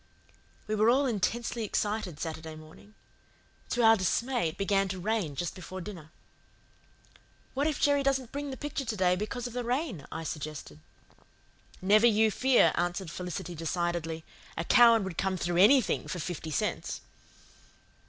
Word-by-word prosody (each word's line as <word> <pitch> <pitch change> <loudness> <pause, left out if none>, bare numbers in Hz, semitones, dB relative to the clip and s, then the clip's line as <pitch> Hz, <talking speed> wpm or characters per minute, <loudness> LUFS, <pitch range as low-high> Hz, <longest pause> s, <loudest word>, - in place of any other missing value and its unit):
We 215 - -3
were 215 +1 +4
all 270 +4 +4
intensely 235 +1 -1
excited 205 -5 -2
Saturday 160 -1 -5
morning. 155 +7 -15 0.7
To 240 - +1
our 225 0 +8
dismay, 230 +1 0
it 160 - -11
began 195 0 +1
to 190 0 -4
rain 190 -6 -1
just 175 +4 -3
before 185 0 -8
dinner. 175 -5 -8 1.4
"What 280 +3 0
if 305 - -1
Jerry 285 -1 +3
doesn't 270 -3 0
bring 285 0 -4
the 265 - -6
picture 290 -1 -4
to 230 -4 -3
day 180 -2 +3
because 215 +6 -4
of 245 - -5
the 245 0 -2
rain?" 245 - -2
I 165 - -5
suggested. 150 - -6 1.0
"Never 210 +4 +6
you 220 -1 +4
fear," 260 +3 +4
answered 175 0 -2
Felicity 180 +1 -5
decidedly. 165 0 -2 0.3
"A 165 - -1
Cowan 230 +2 +6
would 190 -3 -5
come 190 -1 0
through 175 0 -1
ANYTHING 225 +5 +4
for - - -4
fifty 165 -1 -5
cents." 150 - -2
200 Hz, 155 wpm, -29 LUFS, 175-240 Hz, 1.4 s, our